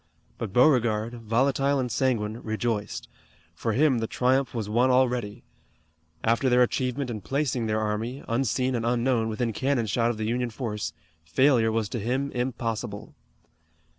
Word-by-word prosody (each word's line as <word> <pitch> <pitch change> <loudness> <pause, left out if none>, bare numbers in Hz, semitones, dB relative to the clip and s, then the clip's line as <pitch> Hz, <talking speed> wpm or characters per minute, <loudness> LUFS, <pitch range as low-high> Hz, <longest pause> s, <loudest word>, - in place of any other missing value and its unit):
But 115 -5 -4
Beauregard, 120 -2 +3
volatile 135 +5 +1
and 125 -2 -2
sanguine, 110 -5 0
rejoiced. 110 -1 -3 0.5
For 115 - -2
him 135 0 +3
the 115 - -2
triumph 130 +3 +1
was 110 -4 -3
won 120 +5 +2
already. 125 -5 +1 0.8
After 115 +4 +2
their 125 0 +4
great 125 - +3
achievement 130 0 -1
in 110 -3 -5
placing 130 -1 -1
their 110 0 0
army, 110 +5 -3
unseen 130 +2 0
and 115 -2 -1
unknown, 120 -1 +1
within 115 +1 -1
cannon 130 0 0
shot 115 +2 +1
of 120 - -2
the 110 - -2
Union 120 +2 -1
force, 110 -6 -4 0.3
failure 115 - +3
was 110 -1 0
to 120 - -3
him 130 +6 -1
impossible. 120 -4 -3
120 Hz, 155 wpm, -26 LUFS, 110-130 Hz, 0.8 s, their